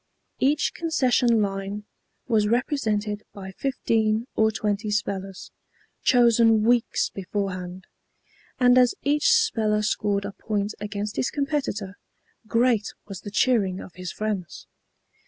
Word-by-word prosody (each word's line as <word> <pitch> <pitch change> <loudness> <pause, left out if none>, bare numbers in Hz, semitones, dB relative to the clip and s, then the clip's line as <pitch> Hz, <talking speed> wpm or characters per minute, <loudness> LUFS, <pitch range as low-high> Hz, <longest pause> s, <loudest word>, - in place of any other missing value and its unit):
Each 290 +3 +2
concession 250 -8 +2
line 195 +1 -4 0.4
was 215 -4 +2
represented 215 -4 0
by 190 -1 -8
fifteen 225 -2 0
or 220 0 +4
twenty 210 0 -2
spellers, 195 -2 -3 0.5
chosen 230 -3 +4
weeks 240 +1 +2
beforehand; 185 -2 -4 0.7
and 250 0 +6
as 250 -1 +4
each 295 - +3
speller 220 - +2
scored 205 -1 0
a 200 - -4
point 205 0 -3
against 205 0 -4
his - - +1
competitor, 275 -9 -3 0.5
great 230 -2 +1
was 195 -3 -8
the - - -7
cheering 200 -4 +1
of 180 - -10
his 180 -1 -6
friends. 185 - -4
215 Hz, 120 wpm, -25 LUFS, 200-245 Hz, 0.7 s, and